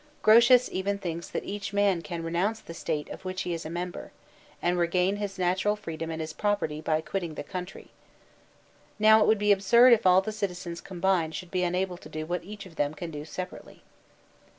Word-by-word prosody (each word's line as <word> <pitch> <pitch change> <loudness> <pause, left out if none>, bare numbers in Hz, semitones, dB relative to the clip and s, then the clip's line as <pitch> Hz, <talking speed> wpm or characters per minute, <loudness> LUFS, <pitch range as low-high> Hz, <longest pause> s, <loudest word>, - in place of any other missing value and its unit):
Grotius 240 +3 +7
even 200 +2 -1
thinks 170 -3 -5
that - - -4
each 200 0 -5
man 200 -4 +2
can 165 +1 -6
renounce 180 +7 -1
the 165 - -10
State 155 -3 -3
of - - -9
which 185 0 -3
he 175 - -2
is 165 -2 -5
a - - -7
member, 175 +1 -5 0.5
and 175 +1 0
regain 180 +3 +1
his 200 -1 -4
natural 185 +3 +1
freedom 165 -5 -6
and 160 0 -4
his 155 0 -4
property 205 -8 -1
by 155 0 0
quitting 170 -2 -4
the 145 - -5
country. 180 +4 -7
♦ - - -23 1.1
Now 220 +1 +6
it - - +4
would 220 - +4
be 210 0 +2
absurd 235 +6 +6
if 215 -5 +3
all 185 +1 +6
the 215 - -4
citizens 180 -4 -4
combined 175 -3 0
should 180 -2 -7
be 185 - 0
unable 180 0 -1
to 155 - -13
do 155 0 -5
what 175 +2 -3
each 205 +2 -9
of 170 -4 -14
them 145 +1 0
can 165 +2 -6
do 150 -1 -6
separately. 180 +4 -8
180 Hz, 210 wpm, -27 LUFS, 165-200 Hz, 1.1 s, Grotius